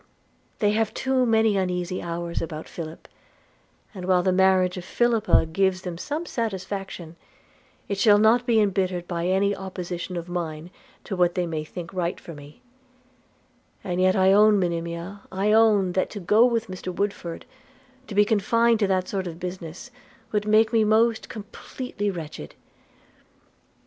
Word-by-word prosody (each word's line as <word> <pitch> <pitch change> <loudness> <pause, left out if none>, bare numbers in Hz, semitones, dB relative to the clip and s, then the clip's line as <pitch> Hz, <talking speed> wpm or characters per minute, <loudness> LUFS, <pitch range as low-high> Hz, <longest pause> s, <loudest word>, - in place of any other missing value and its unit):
They 205 -1 +2
have 220 0 0
too 260 -1 +1
many 220 -2 +3
uneasy 180 -1 -1
hours 170 0 -4
about 160 -1 -6
Philip; 160 -1 -8 0.9
and 185 -3 -7
while 180 -1 +3
the 185 - +2
marriage 185 -1 +3
of 180 - -6
Philippa 230 -3 +2
gives 185 +3 0
them 180 -2 -5
some 300 - -4
satisfaction, 195 - -5 0.7
it 200 -1 -3
shall 205 0 +6
not 230 +4 +4
be 230 -2 +4
embittered 185 -3 0
by 170 -1 -2
any 200 +2 +2
opposition 180 -2 -5
of 170 0 -5
mine 170 -1 -5 0.3
to 200 - -4
what 175 -1 +2
they 180 - 0
may 160 -2 -3
think 170 +3 -8
right 180 -1 -2
for 170 - -10
me 145 - -14 0.6
– - - -38
and 180 0 -2
yet 185 0 +4
I 190 0 +4
own, 210 0 +6
Monimia, 170 +2 -3
I 195 +3 0
own, 215 -4 +4
that 185 +1 0
to 205 - -7
go 210 +6 +4
with 230 -2 0
Mr 185 -2 -6
Woodford, 180 -3 -4 0.6
to 205 - -7
be 205 0 +5
confined 230 +2 +2
to 205 - +2
that 185 -1 0
sort 190 -2 -3
of 165 -1 -7
business, 180 +5 -7 0.4
would 210 0 -1
make 220 +1 +4
me 225 -1 +4
most 220 +1 +2
completely 210 0 -5
wretched.' 160 - -7
190 Hz, 160 wpm, -24 LUFS, 175-215 Hz, 0.9 s, shall